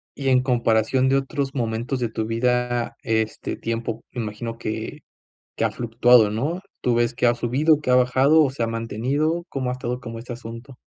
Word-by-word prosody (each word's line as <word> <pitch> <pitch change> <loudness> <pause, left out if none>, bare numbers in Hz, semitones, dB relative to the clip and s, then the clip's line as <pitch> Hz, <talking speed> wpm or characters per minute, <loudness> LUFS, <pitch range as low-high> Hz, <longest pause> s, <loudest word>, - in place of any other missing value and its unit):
Y 135 -1 -1
en 130 0 +4
comparación 120 +1 +2
de 135 - +3
otros 135 0 -2
momentos 120 +2 -2
de 120 - 0
tu 110 -1 -3
vida, 120 +1 0
este 110 -1 -1
tiempo 115 0 -4
me 120 - -4
imagino 115 +2 -5
que 110 -1 -5 0.6
que - - 0
ha - - +2
fluctuado, 120 -2 +4
¿no? 145 - -2 0.2
Tú 125 - +2
ves 120 +1 +1
que 125 - -2
ha 120 - +4
subido, 140 +6 +2
que 130 - -2
ha - - +5
bajado, 130 +5 +5
o 135 - 0
se 135 -3 -4
ha - - +2
mantenido, 130 +9 -1
¿cómo 130 -2 -2
ha - - -1
estado, 125 -1 -4
como 115 -2 -7
este 120 +1 -7
asunto? 120 +2 -10
125 Hz, 200 wpm, -23 LUFS, 115-130 Hz, 0.6 s, ha